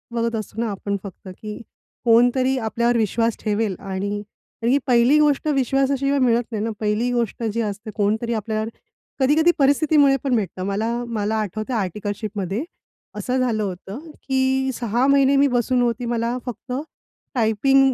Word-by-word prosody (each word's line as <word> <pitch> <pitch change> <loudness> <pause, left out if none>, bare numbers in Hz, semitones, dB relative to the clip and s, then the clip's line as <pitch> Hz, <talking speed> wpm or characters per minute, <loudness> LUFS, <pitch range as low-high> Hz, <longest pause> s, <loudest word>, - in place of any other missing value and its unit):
बघत 230 0 0
असतो 215 0 -5
ना 235 - -1
आपण 200 +1 -3
फक्त, 200 0 -10
की 210 +3 -8 0.5
कोणतरी 245 +3 +4
आपल्यावर 235 +1 +1
विश्वास 225 +1 +1
ठेवेल 210 -2 0
आणि 200 +1 -3 0.4
तर - - +1
ही 260 +4 +4
पहिली 250 +4 +5
गोष्ट 295 0 +2
विश्वासाशिवाय 275 0 +1
मिळत 240 -2 +3
नाही 215 -2 -2
ना, 225 - -1
पहिली 215 +3 0
गोष्ट 235 -1 -1
जी 225 +1 -1
असते, 215 0 -4
कोणतरी 220 +3 0
आपल्यावर 220 0 -2 0.5
कधी-कधी 305 +6 +4
परिस्थितीमुळे 285 0 +4
पण 270 -3 +1
भेटतं. 190 -4 -2
मला, 210 +4 -1
मला 220 -2 -1
आठवतंय 215 +4 -3
आर्टिकलशिपमध्ये 205 - -3 0.5
असं 255 0 -1
झालं 230 -4 +1
होतं, 195 +3 -5 0.3
की 265 0 +1
6 240 +1 +1
महिने 275 0 +4
मी 280 +1 +5
बसून 250 0 +1
होती. 240 0 0
मला 235 +1 -1
फक्त 250 +1 -6 0.6
टायपिंग 260 +4 +3
235 Hz, 150 wpm, -22 LUFS, 210-265 Hz, 0.6 s, पहिली